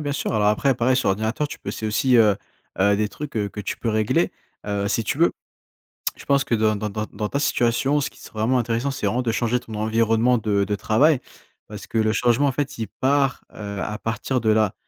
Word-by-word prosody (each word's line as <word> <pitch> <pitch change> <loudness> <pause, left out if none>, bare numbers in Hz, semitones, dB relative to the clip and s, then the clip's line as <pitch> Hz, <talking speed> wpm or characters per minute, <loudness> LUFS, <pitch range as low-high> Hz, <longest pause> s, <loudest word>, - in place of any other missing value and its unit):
bien 145 -1 -2
sûr, 145 - -2
alors 105 -2 +2
après 110 +6 +3
pareil 125 +2 +2
sur 130 - +1
ordinateur 110 +9 0
tu 165 - -8
peux - - -9
essayer 110 - -4
aussi, 125 +4 +3
heu 105 -4 +5 0.4
heu 100 +2 +4
des 105 0 0
trucs 150 +6 -7
que 105 -1 -3
tu 100 - -4
peux 115 - -3
régler, 110 -1 +1 0.3
heu, 100 -1 -1
si 110 +3 0
tu 110 - -2
veux. 170 - +4 0.8
Je - - -13
pense 140 -1 +3
que 120 - 0
dans 110 -1 +2
dans 105 +1 -3
dans 105 +1 -3
dans 105 -1 -3
ta - - -1
situation 140 +1 +1
ce - - -2
qui - - -20
serait 110 - -10
vraiment 120 +4 +2
intéressant 120 +2 0
c'est 135 - -3
vraiment 125 - +1
de 120 -2 0
changer 120 +2 0
ton 115 -3 -9
environnement 115 +2 +2
de 100 -2 +1
de 105 +1 -1
travail. 130 +8 +3 0.5
Parce 105 0 -9
que 115 - -1
le 110 0 +2
changement 120 +5 +2
en - - +2
fait, 135 -1 -3
il 110 - -2
part, 135 +5 0
heu, 100 -1 -6
à 105 +3 -3
partir 120 +3 -2
de 110 - +1
là 110 -2 +3
115 Hz, 240 wpm, -23 LUFS, 105-130 Hz, 0.8 s, heu